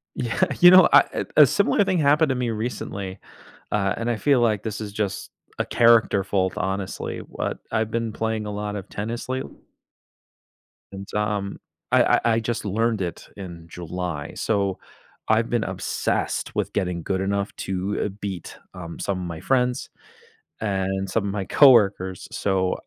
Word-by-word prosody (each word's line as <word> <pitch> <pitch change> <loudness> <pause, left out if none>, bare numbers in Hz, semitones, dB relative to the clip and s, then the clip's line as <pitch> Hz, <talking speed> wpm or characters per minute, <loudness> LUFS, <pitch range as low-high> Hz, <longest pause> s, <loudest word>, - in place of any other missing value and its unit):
Yeah. 120 +8 -1 0.2
You 175 0 +9
know, 185 -2 +8
I 145 - +4
a 150 - +9
similar 200 - +2
thing 190 -2 0
happened 150 +1 +4
to 130 - +1
me 125 -1 -1
recently, 100 -4 -4 0.5
uh, 100 -2 +1
and 115 +1 -2
I 120 - 0
feel 135 +3 +3
like 110 -4 +2
this 110 -2 -4
is 105 -2 -6
just 105 -1 -3 0.3
a - - +1
character 115 -4 +4
fault, 95 -1 0
honestly. 95 0 -3
What - - -5
I've 110 -1 0
been 115 -1 -2
playing 110 -1 -2
a - - -4
lot 105 0 -4
of 95 - -7
tennis 115 +4 -5
late 130 +1 -2 1.5
and, 100 0 -8
um, 105 -2 -1 0.3
I - - +5
I - - +3 0.2
I - - +2
just 115 0 -3
learned 110 +1 0
it 85 -2 -5
in 85 -4 -9
July, 85 -3 -5
so, 100 -3 -1 0.5
I've 110 +1 +3
been 120 -2 +1
obsessed - - -2
with - - -1
getting 90 -4 -2
good 95 +2 -1
enough 100 +1 -1
to, 95 +2 -2
uh, - - -1
beat, 95 -4 -5 0.2
um, 85 -3 -8
some 100 -2 -2
of 90 - -4
my 85 -2 -6
friends 125 -2 0 0.7
and 95 -2 -1
some 100 +2 0
of 100 - -2
my 100 -1 -3
coworkers, 100 - +4
so, 95 -2 0
105 Hz, 170 wpm, -24 LUFS, 95-115 Hz, 1.5 s, You